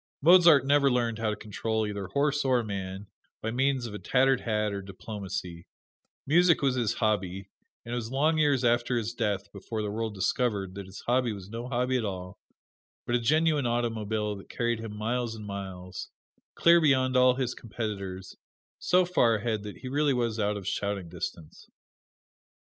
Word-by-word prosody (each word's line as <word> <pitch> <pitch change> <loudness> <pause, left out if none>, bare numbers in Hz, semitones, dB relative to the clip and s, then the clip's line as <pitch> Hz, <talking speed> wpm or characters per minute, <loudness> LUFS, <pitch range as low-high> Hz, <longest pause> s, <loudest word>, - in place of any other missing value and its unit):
Mozart 170 -5 +7
never 140 0 +4
learned 120 -3 0
how 110 -1 0
to 105 - -1
control 110 +1 -2
either 100 -2 -4
horse 145 +7 +1
or 130 -3 +2
man 95 -1 -5 0.3
by 115 - -3
means 130 +1 +1
of 110 - -6
a 105 - -5
tattered 135 0 +2
hat 105 -2 -1
or 100 - -4
diplomacy: 95 -3 -6 0.6
music 170 +1 +4
was 135 -2 +3
his 120 -4 0
hobby, 95 -3 -1 0.3
and 120 - -5
it - - 0
was 115 -2 -3
long 155 +5 +2
years 145 -4 +3
after 120 +1 +2
his 115 0 -2
death 105 -5 -2
before 110 -2 -5
the 105 - -3
world 110 0 -3
discovered 100 -1 0
that 100 -1 -8
his 95 - -10
hobby 125 -1 +1
was 100 -1 -8
no 115 +2 -5
hobby 125 0 0
at 120 - -2
all, 90 -2 -5 0.7
but 120 - -2
a 120 - +3
genuine 150 +2 +2
automobile 110 -3 -1
that 100 - -12
carried 120 -1 -1
him 110 -2 -7
miles 115 +1 -2
and 105 -1 -8
miles, 95 -2 -7 0.5
clear 170 0 +6
beyond 130 -4 +3
all 125 0 +5
his 130 -1 -1
competitors: 100 -5 -6 0.4
so 180 0 +3
far 125 -10 +3
ahead 110 0 -1
that 105 -1 -8
he 130 - -8
was 130 - -6 0.5
really - - +2
out 105 0 0
of 95 -2 -7
shouting 100 -4 -2
distance. 80 -1 -7
115 Hz, 180 wpm, -28 LUFS, 100-130 Hz, 0.7 s, Mozart